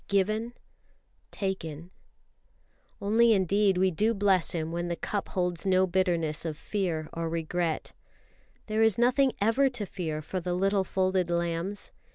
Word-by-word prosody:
"Given... 215 Hz, +4 st, 0 dB, 0.8 s
Taken.. 175 Hz, -4 st, -4 dB, 0.5 s
." -, -, -39 dB
Only 225 Hz, +3 st, +4 dB
indeed 195 Hz, 0 st, +2 dB
we 190 Hz, 0 st, +3 dB
do 215 Hz, +7 st, +1 dB
bless 195 Hz, -3 st, +2 dB
Him 160 Hz, -1 st, -2 dB
when 175 Hz, +1 st, -2 dB
the 170 Hz, -, -2 dB
cup 205 Hz, +3 st, -3 dB
holds 180 Hz, -2 st, -1 dB
no 190 Hz, -1 st, +3 dB
bitterness 170 Hz, -4 st, 0 dB
of 160 Hz, -3 st, -4 dB
fear 170 Hz, -5 st, -2 dB
or 165 Hz, 0 st, -3 dB
of -, -, -4 dB
regret. 165 Hz, 0 st, -2 dB, 0.7 s
There 215 Hz, 0 st, 0 dB
is 220 Hz, -3 st, +4 dB
nothing 255 Hz, +2 st, +3 dB
ever 230 Hz, +6 st, +3 dB
to 240 Hz, -5 st, -4 dB
fear 160 Hz, -5 st, -4 dB
for 185 Hz, +5 st, -3 dB
the 180 Hz, 0 st, -2 dB
little 195 Hz, +1 st, +2 dB
folded 185 Hz, -1 st, 0 dB
lambs. 170 Hz, +3 st, -2 dB
185 Hz, 155 wpm, -28 LUFS, 170-205 Hz, 0.8 s, Only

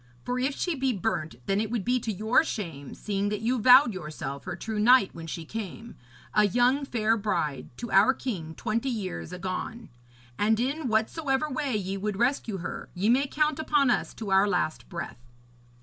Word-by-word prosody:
For 250 Hz, 0 st, -1 dB
if 270 Hz, +2 st, 0 dB
she 355 Hz, -, 0 dB
be 265 Hz, -3 st, 0 dB
burnt, 190 Hz, -, -2 dB
then 195 Hz, +1 st, +1 dB
it 220 Hz, -, -2 dB
would 230 Hz, -4 st, -2 dB
be 250 Hz, +1 st, +2 dB
to 225 Hz, -, -3 dB
your 220 Hz, -, +3 dB
shame, 165 Hz, -, -5 dB
seeing 200 Hz, -1 st, -2 dB
that 210 Hz, 0 st, -3 dB
you 245 Hz, +3 st, +1 dB
vowed 250 Hz, +1 st, +7 dB
yourself 150 Hz, -5 st, -6 dB
her -, -, -4 dB
true 215 Hz, +4 st, -4 dB
knight 240 Hz, -1 st, +5 dB
when 165 Hz, -1 st, -8 dB
she 165 Hz, +1 st, -5 dB
came, 225 Hz, +4 st, -7 dB, 0.4 s
a 210 Hz, -, +5 dB
young 245 Hz, +7 st, +2 dB
fair 225 Hz, -4 st, +1 dB
bride, 175 Hz, -, -2 dB
to 235 Hz, -, -6 dB
our 195 Hz, +6 st, +6 dB
king, 165 Hz, -11 st, -5 dB
twenty 230 Hz, +4 st, -1 dB
years 195 Hz, -8 st, -4 dB
agone. 185 Hz, +5 st, -5 dB, 0.5 s
And 220 Hz, +1 st, +3 dB
in 275 Hz, +4 st, -1 dB
whatsoever 265 Hz, +6 st, 0 dB
way 270 Hz, -2 st, -1 dB
ye 195 Hz, -1 st, -3 dB
would 205 Hz, 0 st, -3 dB
rescue 240 Hz, -3 st, 0 dB
her, -, -, -6 dB
ye 195 Hz, +5 st, +1 dB
may 270 Hz, +4 st, +3 dB
count 305 Hz, +1 st, 0 dB
upon 295 Hz, -4 st, +3 dB
us -, -, -1 dB
to 215 Hz, -3 st, -5 dB
our 190 Hz, +1 st, +5 dB
last 175 Hz, -5 st, -1 dB
breath.' 170 Hz, -8 st, -7 dB
220 Hz, 190 wpm, -27 LUFS, 190-250 Hz, 0.5 s, vowed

